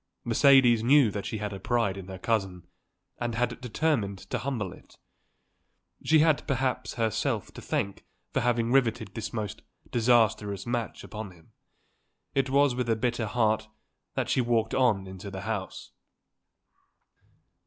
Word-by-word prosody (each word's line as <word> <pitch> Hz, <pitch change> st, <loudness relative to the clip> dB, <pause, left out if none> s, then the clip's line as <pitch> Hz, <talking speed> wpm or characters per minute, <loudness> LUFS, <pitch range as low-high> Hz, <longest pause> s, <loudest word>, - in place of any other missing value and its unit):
Mercedes 120 Hz, -1 st, +5 dB
knew 130 Hz, -1 st, +5 dB
that 100 Hz, 0 st, -4 dB
she 110 Hz, -, -3 dB
had 105 Hz, -1 st, -4 dB
a 95 Hz, -, -6 dB
pride 115 Hz, -2 st, 0 dB
in 95 Hz, -2 st, -8 dB
her 95 Hz, -1 st, -7 dB
cousin 95 Hz, -4 st, -1 dB, 0.5 s
and 120 Hz, -1 st, -2 dB
had 125 Hz, +1 st, -1 dB
determined 125 Hz, -5 st, 0 dB
to 125 Hz, -, 0 dB
humble 115 Hz, -7 st, -3 dB
it. -, -, -18 dB, 1.1 s
She 160 Hz, -, +4 dB
had 155 Hz, -2 st, +2 dB
perhaps 130 Hz, -2 st, -1 dB
herself 115 Hz, -3 st, -1 dB
to -, -, -9 dB
thank 100 Hz, -1 st, -2 dB, 0.3 s
for -, -, +2 dB
having 120 Hz, -1 st, +1 dB
riveted 115 Hz, -7 st, +1 dB
this 115 Hz, 0 st, -5 dB
most 110 Hz, -4 st, -4 dB, 0.3 s
disastrous 110 Hz, -4 st, +2 dB
match 120 Hz, -1 st, -3 dB
upon 110 Hz, -1 st, -7 dB
him. 85 Hz, -3 st, -19 dB, 0.8 s
It 135 Hz, -1 st, +1 dB
was 140 Hz, 0 st, +4 dB
with 125 Hz, -1 st, -2 dB
a 115 Hz, -, +3 dB
bitter 120 Hz, 0 st, -1 dB
heart 110 Hz, -1 st, +1 dB, 0.5 s
that -, -, -1 dB
she 130 Hz, -, +2 dB
walked 115 Hz, -2 st, +1 dB
on 115 Hz, -7 st, +2 dB
into 95 Hz, +1 st, -8 dB
the 95 Hz, -1 st, -6 dB
house. 100 Hz, -3 st, -5 dB
115 Hz, 150 wpm, -28 LUFS, 100-125 Hz, 1.1 s, Mercedes